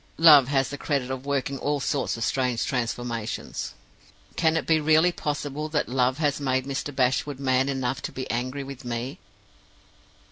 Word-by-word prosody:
Love 150 Hz, -5 st, +8 dB
has 135 Hz, -1 st, +1 dB
the 145 Hz, -, -6 dB
credit 135 Hz, -4 st, -1 dB
of 130 Hz, +1 st, -5 dB
working 140 Hz, -1 st, -1 dB
all 145 Hz, 0 st, 0 dB
sorts 135 Hz, -2 st, -1 dB
of 115 Hz, -, -3 dB
strange 125 Hz, 0 st, 0 dB
transformations. 120 Hz, -2 st, -3 dB, 0.6 s
Can 160 Hz, -1 st, +2 dB
it -, -, -2 dB
be 160 Hz, -1 st, +3 dB
really 160 Hz, +3 st, +4 dB
possible 150 Hz, -1 st, -3 dB
that 150 Hz, -1 st, 0 dB
Love 130 Hz, +1 st, +1 dB
has 145 Hz, -2 st, 0 dB
made 130 Hz, -1 st, 0 dB
Mr. 140 Hz, +1 st, -3 dB
Bashwood 130 Hz, +2 st, +1 dB
man 130 Hz, 0 st, +2 dB
enough 130 Hz, -1 st, -2 dB
to -, -, -5 dB
be 130 Hz, -, -5 dB
angry 130 Hz, +4 st, -2 dB
with 135 Hz, -1 st, -9 dB
me? 120 Hz, +3 st, -4 dB
135 Hz, 170 wpm, -26 LUFS, 125-145 Hz, 0.6 s, Love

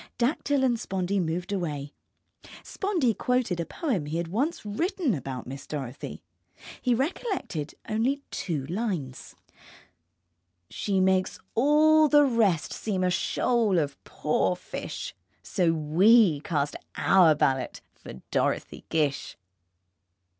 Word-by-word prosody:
Dactyl 275 Hz, +2 st, +1 dB
and 240 Hz, -3 st, +2 dB
Spondee 190 Hz, 0 st, -1 dB
moved 175 Hz, +2 st, -2 dB
away. 150 Hz, -6 st, -3 dB, 0.7 s
Spondee 350 Hz, -, 0 dB
quoted 250 Hz, -8 st, 0 dB
a 170 Hz, -, -2 dB
poem 220 Hz, -, -2 dB
he 155 Hz, +2 st, -2 dB
had 170 Hz, -1 st, -3 dB
once 260 Hz, -, -1 dB
written 300 Hz, -, 0 dB
about 135 Hz, -4 st, -5 dB
Miss 135 Hz, +2 st, -8 dB
Dorothy. 140 Hz, -3 st, -6 dB, 0.6 s
He 250 Hz, -2 st, +2 dB
recollected 270 Hz, -, -3 dB
only 255 Hz, +6 st, 0 dB
two 155 Hz, -8 st, -3 dB
lines: 175 Hz, -, -4 dB, 1.4 s
She 195 Hz, -2 st, -1 dB
makes 185 Hz, 0 st, +2 dB, 0.2 s
all 305 Hz, +5 st, +5 dB
the 290 Hz, 0 st, +6 dB
rest 220 Hz, -, +1 dB
seem 195 Hz, -4 st, -2 dB
a 180 Hz, -, +2 dB
shoal 220 Hz, +2 st, +1 dB
of 145 Hz, -4 st, -2 dB
poor 155 Hz, +4 st, 0 dB
fish -, -, -6 dB, 0.3 s
So 180 Hz, -5 st, +1 dB
we 165 Hz, +3 st, +4 dB
cast 145 Hz, -4 st, -2 dB, 0.2 s
our 175 Hz, -5 st, +5 dB
ballot 130 Hz, -3 st, 0 dB
for -, -, -11 dB, 0.2 s
Dorothy -, -, -1 dB
Gish. 145 Hz, -3 st, -1 dB
190 Hz, 120 wpm, -27 LUFS, 155-245 Hz, 1.4 s, the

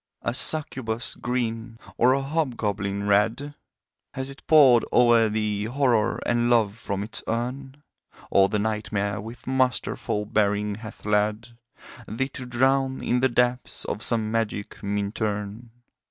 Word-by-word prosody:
A 120 Hz, -, -1 dB
succubus 125 Hz, -5 st, 0 dB
green, 115 Hz, -2 st, -3 dB, 0.2 s
or 125 Hz, +2 st, +4 dB
a 135 Hz, 0 st, 0 dB
hobgoblin 105 Hz, -9 st, -2 dB
red, 110 Hz, +8 st, +1 dB, 0.6 s
Has 130 Hz, +1 st, -3 dB
it 140 Hz, -, -13 dB
poured 135 Hz, -7 st, +6 dB
o'er 120 Hz, -2 st, +5 dB
thee 105 Hz, -1 st, -1 dB
Horror 120 Hz, -2 st, +1 dB
and 120 Hz, 0 st, +1 dB
Love 110 Hz, -4 st, +3 dB
from 100 Hz, -3 st, -4 dB
its 110 Hz, -, -2 dB
urn? 130 Hz, +4 st, -4 dB, 0.5 s
Or 95 Hz, 0 st, +5 dB
the 105 Hz, -, 0 dB
Nightmare 105 Hz, -1 st, -2 dB
with 115 Hz, +2 st, -10 dB
masterful 130 Hz, -5 st, 0 dB
bearing 105 Hz, 0 st, 0 dB
hath 110 Hz, 0 st, -10 dB
led 105 Hz, +2 st, 0 dB, 0.6 s
Thee 130 Hz, +5 st, -2 dB
to 130 Hz, -2 st, -8 dB
drown 130 Hz, +2 st, +1 dB
in 125 Hz, -, +1 dB
the 130 Hz, +1 st, +3 dB
depths 125 Hz, +1 st, 0 dB
of -, -, -4 dB
some 110 Hz, -2 st, +1 dB
magic 110 Hz, -2 st, -3 dB
Minturne? 105 Hz, +2 st, -3 dB
115 Hz, 135 wpm, -25 LUFS, 105-125 Hz, 0.6 s, poured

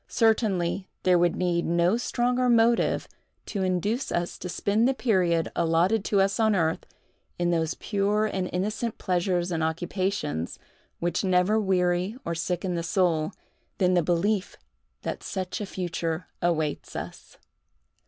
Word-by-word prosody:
Certainly, 200 Hz, -5 st, +1 dB, 0.2 s
there 180 Hz, -1 st, +4 dB
would 175 Hz, -1 st, +2 dB
need 175 Hz, -1 st, 0 dB
no 170 Hz, +4 st, +2 dB
stronger 245 Hz, +1 st, +1 dB
motive 230 Hz, 0 st, +3 dB, 0.4 s
to 200 Hz, -, -3 dB
induce 190 Hz, +7 st, 0 dB
us 175 Hz, 0 st, -2 dB
to 180 Hz, -, -5 dB
spend 210 Hz, +6 st, +1 dB
the 270 Hz, -, +1 dB
period 180 Hz, -10 st, +1 dB
allotted 170 Hz, +6 st, +2 dB
to 200 Hz, -, +2 dB
us 195 Hz, +3 st, +1 dB
on 220 Hz, -2 st, +3 dB
earth, 160 Hz, -3 st, 0 dB, 0.5 s
in 175 Hz, 0 st, +1 dB
those 165 Hz, -1 st, 0 dB
pure 205 Hz, +1 st, 0 dB
and 190 Hz, -4 st, -2 dB
innocent 210 Hz, +5 st, -2 dB
pleasures 180 Hz, -1 st, 0 dB
and 165 Hz, -2 st, -1 dB
occupations, 165 Hz, -, -2 dB, 0.4 s
which 175 Hz, +2 st, -1 dB
never 185 Hz, +3 st, +3 dB
weary 180 Hz, +1 st, +1 dB
or 170 Hz, -, -1 dB
sicken 180 Hz, +2 st, -2 dB
the 170 Hz, -, -1 dB
soul, 170 Hz, -2 st, +1 dB, 0.5 s
than 185 Hz, -2 st, +3 dB
the 175 Hz, -, +4 dB
belief 185 Hz, +5 st, 0 dB, 0.5 s
that -, -, -4 dB
such 190 Hz, +2 st, -4 dB
a 205 Hz, -, -3 dB
future 175 Hz, -2 st, -3 dB, 0.2 s
awaits 160 Hz, -4 st, -1 dB
us! -, -, -8 dB
180 Hz, 145 wpm, -26 LUFS, 170-205 Hz, 0.5 s, there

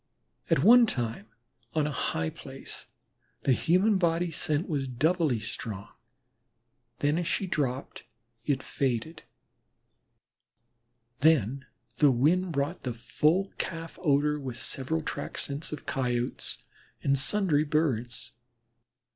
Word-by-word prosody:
At -, -, +3 dB
one 240 Hz, +1 st, +8 dB
time 115 Hz, -, -3 dB, 0.5 s
on 155 Hz, -2 st, +2 dB
a 150 Hz, -, -1 dB
high 80 Hz, -, -1 dB
place -, -, -9 dB, 0.6 s
the -, -, +3 dB
human 190 Hz, -, +3 dB
body 170 Hz, 0 st, +1 dB
scent 155 Hz, +1 st, -1 dB
was 140 Hz, -5 st, -1 dB
doubly 145 Hz, +1 st, +1 dB
strong, 105 Hz, -1 st, -5 dB, 1.1 s
then 145 Hz, +3 st, +2 dB
as 175 Hz, -, -2 dB
she 195 Hz, -, 0 dB
dropped 140 Hz, -7 st, -2 dB, 0.4 s
it 135 Hz, -1 st, 0 dB
faded. 135 Hz, +5 st, -2 dB, 2.0 s
Then 140 Hz, -3 st, +3 dB, 0.3 s
the 145 Hz, -, +6 dB
wind 165 Hz, +9 st, +2 dB
brought 145 Hz, +4 st, -1 dB
the 125 Hz, -3 st, -4 dB
full 155 Hz, +11 st, +1 dB
calf 165 Hz, -1 st, -5 dB
odor 150 Hz, -2 st, +2 dB
with 130 Hz, -4 st, -6 dB
several 160 Hz, +5 st, -2 dB
track -, -, -5 dB
scents 145 Hz, +2 st, -3 dB
of 150 Hz, -, -6 dB
Coyotes 125 Hz, -3 st, -2 dB, 0.4 s
and 140 Hz, -, +3 dB
sundry 155 Hz, +1 st, +3 dB
Birds. 125 Hz, -6 st, -1 dB
145 Hz, 115 wpm, -29 LUFS, 125-165 Hz, 2.0 s, one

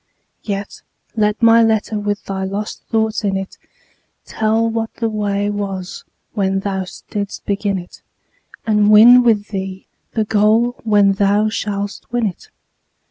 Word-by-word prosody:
Yet 200 Hz, -1 st, -5 dB, 0.3 s
let 210 Hz, +1 st, 0 dB
my 230 Hz, 0 st, +7 dB
letter 220 Hz, -1 st, +1 dB
with 205 Hz, 0 st, -3 dB
thy 190 Hz, -1 st, -4 dB
lost 200 Hz, +2 st, -4 dB
thoughts 220 Hz, -1 st, 0 dB
in 195 Hz, -2 st, 0 dB
it 195 Hz, 0 st, -7 dB, 0.7 s
Tell 220 Hz, +1 st, 0 dB
what 225 Hz, 0 st, -2 dB
the 230 Hz, -1 st, -1 dB
way 205 Hz, -1 st, -1 dB
was 195 Hz, -3 st, -5 dB, 0.3 s
when 195 Hz, -2 st, 0 dB
thou 190 Hz, -2 st, -3 dB, 0.2 s
didst 200 Hz, -1 st, -4 dB
begin 200 Hz, -1 st, -1 dB
it, 180 Hz, -1 st, -11 dB, 0.6 s
And 210 Hz, -1 st, +3 dB
win 235 Hz, +4 st, +8 dB
with 220 Hz, -4 st, +1 dB
thee 190 Hz, -1 st, -5 dB, 0.3 s
the 220 Hz, -2 st, 0 dB
goal 220 Hz, +3 st, +2 dB
when 205 Hz, -3 st, +4 dB
thou 205 Hz, +2 st, +2 dB
shalt 205 Hz, -2 st, -4 dB
win 240 Hz, -1 st, 0 dB
it. 190 Hz, -5 st, -6 dB
210 Hz, 140 wpm, -18 LUFS, 200-220 Hz, 0.7 s, win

